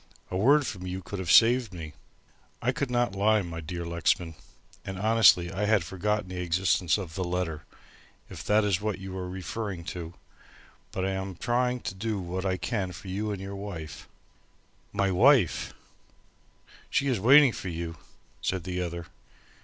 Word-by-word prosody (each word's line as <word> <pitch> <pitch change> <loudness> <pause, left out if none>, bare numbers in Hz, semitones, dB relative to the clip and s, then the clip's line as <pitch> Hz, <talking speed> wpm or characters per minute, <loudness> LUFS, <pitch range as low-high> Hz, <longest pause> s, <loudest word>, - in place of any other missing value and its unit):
"A - - -3
word 140 +9 +4
from 90 -5 -5
you 95 +1 -5
could 100 - -6
have 95 -2 -1
saved 115 -3 +5
me." 80 -3 -7 0.7
"I 125 - +1
could 135 +1 -2
not 120 -4 +1
lie, 105 +1 +3
my 85 -1 -6
dear 85 +2 -5
Lexman. 85 0 0 0.5
And 95 0 -6
honestly, 100 -4 +5
I 100 +2 -1
had 105 -3 +3
forgotten 100 +3 -2
the 90 -1 -4
existence 90 0 +2
of 90 -6 -6
the 95 - -2
letter; 85 -3 -3 0.6
if - - -9
that 105 +1 +4
is 100 -2 +1
what 105 -2 -1
you 95 0 -7
are 90 -1 -4
referring 95 0 -5
to, 85 -1 -7 0.8
but 95 - -2
I 95 - 0
am 95 -1 -4
trying 125 +5 0
to - - -4
do 105 +2 -3
what 95 +1 -3
I 95 0 0
can 100 -3 -2
for 95 +3 -9
you 105 +3 -2
and 100 - -2
for 95 - -8
your 100 +1 -6
wife." 80 -9 -7 0.8
"My 100 -1 +1
wife!" 120 - +4 1.2
"She - - +1
is 130 -6 +1
waiting 135 +5 +7
for 95 - -6
you," 85 -1 -5 0.4
said 95 -3 -1
the 90 0 -3
other. 85 -1 -4
95 Hz, 175 wpm, -28 LUFS, 90-105 Hz, 1.2 s, waiting